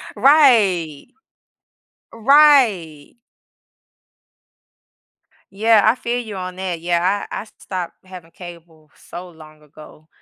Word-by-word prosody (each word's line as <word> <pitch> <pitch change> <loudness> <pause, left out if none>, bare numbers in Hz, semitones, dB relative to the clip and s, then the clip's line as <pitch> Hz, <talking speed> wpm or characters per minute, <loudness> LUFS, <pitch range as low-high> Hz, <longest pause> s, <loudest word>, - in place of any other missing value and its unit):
Right. 215 - +2 1.0
Right. 230 - +2 2.4
Yeah, 215 +1 +2
I 220 +3 +3
feel 245 -1 -4
you 220 -4 -8
on 185 -1 -7
that. 185 -3 -5
Yeah, 175 +4 -1
I - - -5
I - - -12
stopped 180 -3 -7
having 180 -3 -14
cable 170 -3 -15
so 180 +1 -12
long 155 -2 -17
ago. 150 +1 -18
185 Hz, 100 wpm, -18 LUFS, 165-225 Hz, 2.4 s, I